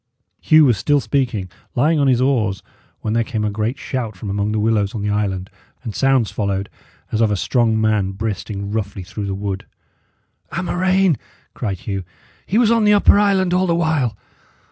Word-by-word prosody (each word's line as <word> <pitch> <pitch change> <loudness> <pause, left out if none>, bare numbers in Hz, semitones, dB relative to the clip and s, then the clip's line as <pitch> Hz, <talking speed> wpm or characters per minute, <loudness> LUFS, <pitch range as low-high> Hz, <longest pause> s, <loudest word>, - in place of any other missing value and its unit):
Hugh 155 -1 +5
was 120 -7 +3
still 145 +8 +2
speaking, 115 -5 -1 0.3
lying 150 +5 +3
on 140 - +3
his 125 -2 +3
oars, 115 -8 +1 0.4
when 110 - -2
there 115 0 +2
came 110 -2 -3
a 105 - 0
great 110 +5 -2
shout 115 -5 -4
from 100 +2 -5
among 100 +1 -1
the 110 - -1
willows 105 -2 +1
on 105 - -3
the 105 - 0
island, 95 -3 -2 0.3
and 115 -4 -5
sounds 135 -4 +2
followed 100 -2 -2 0.4
as 110 - 0
of 110 - +4
a 105 - +1
strong 115 +2 +1
man 105 -3 +1
breasting 100 -1 -4
roughly 100 -3 -3
through 100 +3 -6
the 95 - -2
wood. 100 0 -4 0.9
"A 185 - -2
murrain!" 185 -2 +2 0.3
cried 100 -7 -4
Hugh. 100 -2 -3 0.4
"He 205 - +1
was 230 -2 +4
on 230 -1 +3
the 210 0 +5
upper 205 0 +5
island 190 -3 +2
all 185 +1 +2
the 170 - +2
while!" 155 -10 0
110 Hz, 190 wpm, -20 LUFS, 100-145 Hz, 0.9 s, Hugh